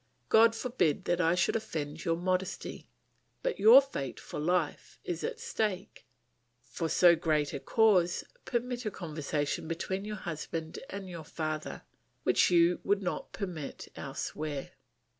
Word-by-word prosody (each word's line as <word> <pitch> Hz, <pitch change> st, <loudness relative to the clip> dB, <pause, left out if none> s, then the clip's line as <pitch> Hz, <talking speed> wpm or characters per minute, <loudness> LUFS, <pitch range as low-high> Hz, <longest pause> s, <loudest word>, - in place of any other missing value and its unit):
God 225 Hz, +1 st, +6 dB
forbid 230 Hz, -, 0 dB
that 175 Hz, 0 st, +1 dB
I 165 Hz, 0 st, +3 dB
should 180 Hz, +4 st, +2 dB
offend 155 Hz, -8 st, -4 dB
your 165 Hz, -1 st, +2 dB
modesty! 185 Hz, +2 st, -2 dB, 0.6 s
But -, -, -1 dB
your 230 Hz, +6 st, +9 dB
fate 135 Hz, -, -5 dB
for -, -, -7 dB
life 170 Hz, 0 st, -1 dB
is 175 Hz, -1 st, -4 dB
at -, -, -3 dB
stake. 210 Hz, -4 st, -3 dB, 0.6 s
For 165 Hz, +6 st, -4 dB
so 175 Hz, 0 st, +6 dB
great 155 Hz, -3 st, 0 dB
a -, -, -3 dB
cause, 185 Hz, -3 st, +3 dB, 0.2 s
permit 245 Hz, 0 st, -2 dB
a 215 Hz, -, -1 dB
conversation 155 Hz, -5 st, -3 dB
between 190 Hz, +4 st, -3 dB
your 210 Hz, 0 st, -4 dB
husband 160 Hz, -2 st, -5 dB
and 195 Hz, -1 st, -6 dB
your 170 Hz, -3 st, -7 dB
father 155 Hz, 0 st, -4 dB, 0.4 s
which -, -, +4 dB
you 175 Hz, 0 st, +4 dB
would 200 Hz, 0 st, +1 dB
not 180 Hz, -, -3 dB
permit 175 Hz, -8 st, -6 dB
elsewhere. 150 Hz, -3 st, -4 dB
175 Hz, 140 wpm, -31 LUFS, 155-200 Hz, 0.6 s, your